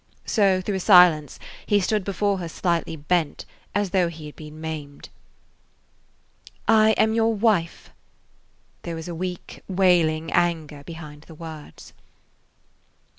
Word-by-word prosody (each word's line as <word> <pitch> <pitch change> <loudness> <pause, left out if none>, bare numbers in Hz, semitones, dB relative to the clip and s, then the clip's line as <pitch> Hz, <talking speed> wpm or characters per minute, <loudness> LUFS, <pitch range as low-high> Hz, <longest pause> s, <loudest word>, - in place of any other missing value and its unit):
So, 195 -4 +2
through 195 +1 -2
a - - -3
silence, 175 - +5 0.3
he 205 -1 +3
stood 205 +2 0
before 200 0 -1
her 170 -2 -5
slightly 170 -1 -1
bent, 155 +1 -1 0.3
as 205 -3 0
though 185 -3 +2
he 165 -2 -9
had 150 - -10
been 155 0 -11
maimed. 155 -3 -7 1.6
"I 220 0 +5
am 220 0 +2
your 225 0 +2
wife." 205 -6 0 0.9
There 170 - -5
was 160 +1 -7
a 175 - -5
weak, 180 +1 -6
wailing 175 -4 +2
anger 155 -4 0
behind 150 -2 -10
the 160 - -12
words. 160 -2 -11
175 Hz, 130 wpm, -23 LUFS, 155-195 Hz, 1.6 s, silence